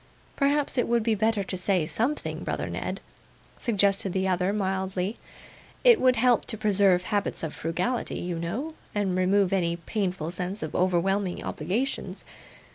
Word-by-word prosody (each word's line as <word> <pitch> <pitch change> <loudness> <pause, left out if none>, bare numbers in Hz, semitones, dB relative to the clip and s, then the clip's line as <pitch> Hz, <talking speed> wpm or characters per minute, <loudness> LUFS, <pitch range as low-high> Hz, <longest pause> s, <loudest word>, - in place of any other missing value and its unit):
'Perhaps 280 -1 +1
it - - +1
would 235 -1 +2
be 225 0 +2
better 215 -1 +1
to 190 - -5
say 185 -2 +1
something, 250 - -2
brother - - -2
Ned,' - - -4 0.6
suggested 200 -4 +2
the 190 0 0
other, 185 +1 +1
mildly; 190 0 -1 0.7
'it 480 -3 +7
would 255 -1 +5
help 245 -1 +3
to 220 - -3
preserve 200 -3 +4
habits 205 -2 -2
of 160 - -3
frugality, 180 +10 -2
you 175 -1 -3
know, 225 - -3 0.2
and 195 -3 0
remove 190 +1 +2
any 170 -3 +1
painful 180 -1 -3
sense 180 +2 -4
of 155 - -5
overwhelming 185 +1 +1
obligations. 190 - -3
195 Hz, 150 wpm, -27 LUFS, 180-220 Hz, 0.7 s, it